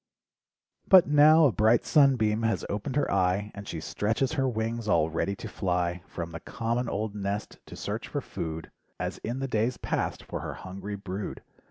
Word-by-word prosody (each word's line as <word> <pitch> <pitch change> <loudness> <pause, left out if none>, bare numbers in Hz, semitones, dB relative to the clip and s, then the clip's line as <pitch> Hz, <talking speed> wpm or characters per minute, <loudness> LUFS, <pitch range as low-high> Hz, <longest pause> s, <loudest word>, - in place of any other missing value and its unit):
But 190 -2 +9
now 150 +2 +6
a 140 - +5
bright 110 +4 +3
sunbeam 125 -8 +4
has 115 0 0
opened 105 +6 -3
her 145 - +1
eye 100 +2 +1
And 100 0 -9
she 80 - -4
stretches 110 - -1
her 135 -4 +1
wings 115 0 -2
all 80 -5 +3
ready 100 +4 -1
to 110 - -7
fly 90 -3 -1
From 85 -1 -6
the 80 - -6
common 115 +3 -2
old 105 0 -2
nest 100 0 -4
to - - -9
search - - -4
for - - -2
food, 80 0 -6 0.3
As - - -3
in 120 +4 -4
the 135 - -1
days 115 +1 0
past, - - -2
for - - -5
her - - -5
hungry 95 +2 -6
brood. 100 0 -6
105 Hz, 185 wpm, -28 LUFS, 95-125 Hz, 0.3 s, But